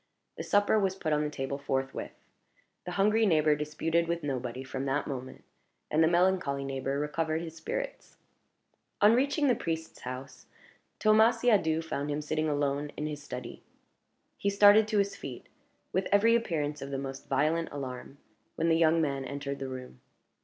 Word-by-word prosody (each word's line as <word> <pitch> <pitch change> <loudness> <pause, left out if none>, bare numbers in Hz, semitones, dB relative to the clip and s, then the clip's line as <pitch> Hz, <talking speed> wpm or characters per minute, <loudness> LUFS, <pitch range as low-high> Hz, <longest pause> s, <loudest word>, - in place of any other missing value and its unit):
The - - -6
supper 205 +1 +3
was 190 -2 0
put 160 -5 -1
on 150 - +2
the 150 - -1
table 140 -1 -4
forthwith. 135 -1 -3 0.7
The 180 - -5
hungry 215 +3 +3
neighbor 155 -3 +4
disputed 160 +3 -1
with 170 -1 -2
nobody 130 -2 -3
from 135 0 -4
that 140 +1 0
moment, 130 -2 -6 0.5
and 155 +2 +4
the - - +5
melancholy 175 -5 +2
neighbor 135 0 -2
recovered 155 +2 -1
his 165 -1 -8
spirits. - - -5 0.8
On 210 +2 +6
reaching 280 +4 +2
the 250 - +5
priest's 160 -6 -4
house, 130 0 -8 0.5
Thomas 220 +2 +4
Siadoux 165 -9 +3
found 145 -2 -3
him 150 +1 -2
sitting 155 +1 -1
alone 145 0 -1
in 150 - -2
his 150 -1 -5
study. - - -7 0.8
He 200 - 0
started 205 +2 +6
to 215 -1 0
his 200 0 +1
feet, 130 -3 -8 0.5
with 190 +1 0
every 220 +3 +5
appearance 150 -10 -1
of 135 - -6
the 140 - -3
most 135 0 -6
violent 155 +5 +1
alarm, 135 -1 -7 0.4
when 165 +1 +1
the 165 - +4
young 165 0 +4
man 140 -2 -1
entered 140 +1 -5
the 135 -1 -4
room. 125 - -9
155 Hz, 170 wpm, -29 LUFS, 140-190 Hz, 0.8 s, On